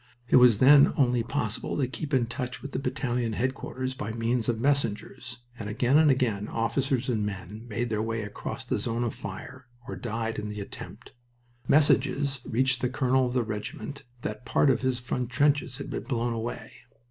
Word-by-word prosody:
It -, -, +7 dB
was 125 Hz, -4 st, +7 dB
then 140 Hz, +4 st, +7 dB
only 125 Hz, -3 st, +3 dB
possible 115 Hz, -2 st, -2 dB
to 135 Hz, -3 st, +1 dB
keep 145 Hz, +3 st, -6 dB
in 130 Hz, -4 st, +3 dB
touch 125 Hz, +1 st, -5 dB
with 140 Hz, -, -6 dB
the -, -, -2 dB
battalion 125 Hz, -3 st, -1 dB
headquarters 130 Hz, +2 st, -2 dB
by 110 Hz, -4 st, -4 dB
means 115 Hz, +1 st, 0 dB
of 115 Hz, -2 st, 0 dB
messengers, 125 Hz, -2 st, -1 dB, 0.2 s
and 105 Hz, -2 st, -4 dB
again 125 Hz, +7 st, +3 dB
and 155 Hz, -1 st, +5 dB
again 115 Hz, -6 st, +1 dB
officers 130 Hz, +2 st, 0 dB
and 115 Hz, -5 st, 0 dB
men 105 Hz, +3 st, -6 dB
made 120 Hz, +1 st, -2 dB
their 105 Hz, -1 st, 0 dB
way 115 Hz, 0 st, -2 dB
across 105 Hz, -, -6 dB
the -, -, -1 dB
zone 115 Hz, +1 st, -1 dB
of 120 Hz, -, -1 dB
fire 130 Hz, -1 st, -8 dB, 0.2 s
or -, -, -5 dB
died 115 Hz, -1 st, -3 dB
in 105 Hz, 0 st, -4 dB
the 105 Hz, 0 st, -5 dB
attempt. 100 Hz, -, -9 dB, 0.6 s
Messages 140 Hz, -2 st, +3 dB
reached 130 Hz, +3 st, +1 dB
the 125 Hz, -, +1 dB
colonel 130 Hz, -1 st, +2 dB
of 125 Hz, -, -4 dB
the 125 Hz, -2 st, +2 dB
regiment 110 Hz, +4 st, -5 dB, 0.2 s
that 105 Hz, +3 st, -4 dB
part 135 Hz, -, +3 dB
of 125 Hz, -, 0 dB
his 130 Hz, -1 st, 0 dB
front 120 Hz, 0 st, -3 dB
trenches 140 Hz, 0 st, +2 dB
had 140 Hz, -, -7 dB
been -, -, -3 dB
blown 120 Hz, -3 st, -1 dB
away. 115 Hz, -1 st, -5 dB
120 Hz, 190 wpm, -27 LUFS, 115-130 Hz, 0.6 s, It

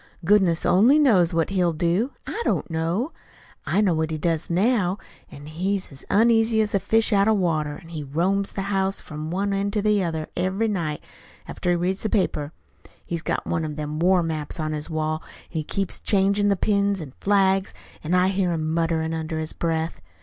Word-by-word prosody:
"Goodness 190 Hz, -4 st, +3 dB
only 215 Hz, +11 st, +5 dB
knows 210 Hz, -, +4 dB
what 165 Hz, +1 st, 0 dB
he'll 180 Hz, -3 st, +1 dB
do 175 Hz, -, +1 dB, 0.2 s
I -, -, -4 dB
don't. -, -, 0 dB, 1.0 s
I 205 Hz, -, +2 dB
know 195 Hz, -5 st, +3 dB
what 160 Hz, 0 st, -1 dB
he 160 Hz, -, -3 dB
does 165 Hz, +1 st, -1 dB
now. 190 Hz, +1 st, +2 dB, 0.3 s
He's 175 Hz, +7 st, -4 dB
as 135 Hz, -, -10 dB
uneasy 225 Hz, +1 st, +4 dB
as 215 Hz, -1 st, +1 dB
a 200 Hz, -, +3 dB
fish 225 Hz, +3 st, +2 dB
out 200 Hz, 0 st, +4 dB
o' 220 Hz, -, +5 dB
water, 155 Hz, -6 st, 0 dB
an' 165 Hz, -, -15 dB
he 155 Hz, -3 st, -5 dB
roams 180 Hz, +8 st, 0 dB
the 195 Hz, -, -3 dB
house 195 Hz, 0 st, +1 dB
from 155 Hz, +1 st, -6 dB
one 195 Hz, +3 st, -1 dB
end 200 Hz, +1 st, -1 dB
to 210 Hz, -, +1 dB
the 210 Hz, -2 st, +2 dB
other 160 Hz, -2 st, -3 dB
every 190 Hz, +5 st, 0 dB
night, 165 Hz, -8 st, -2 dB, 0.4 s
after 180 Hz, -, -3 dB
he 175 Hz, -, +3 dB
reads 180 Hz, +3 st, -1 dB
the 215 Hz, -, -2 dB
paper. 155 Hz, -8 st, 0 dB, 0.5 s
He's 170 Hz, -1 st, -3 dB
got -, -, -2 dB
one 165 Hz, -, -1 dB
of 150 Hz, -1 st, -4 dB
them 150 Hz, 0 st, -4 dB
war 180 Hz, +1 st, +3 dB
maps 155 Hz, -1 st, -4 dB
on 155 Hz, 0 st, -2 dB
his 150 Hz, +1 st, -4 dB
wall, 155 Hz, 0 st, -2 dB
an' -, -, -17 dB
he 160 Hz, -3 st, -3 dB
keeps 195 Hz, +4 st, -2 dB
changin' 200 Hz, +1 st, +2 dB
the 200 Hz, -, +3 dB
pins 200 Hz, 0 st, +1 dB
an' 145 Hz, -6 st, -8 dB
flags, 195 Hz, -1 st, +2 dB, 0.3 s
an' 165 Hz, +4 st, 0 dB
I 180 Hz, +1 st, +4 dB
hear 190 Hz, -2 st, 0 dB
him 155 Hz, -1 st, -2 dB
mutterin' 165 Hz, -1 st, 0 dB
under 160 Hz, 0 st, -3 dB
his 155 Hz, 0 st, -4 dB
breath. 165 Hz, -1 st, -2 dB
180 Hz, 200 wpm, -24 LUFS, 160-200 Hz, 1.0 s, only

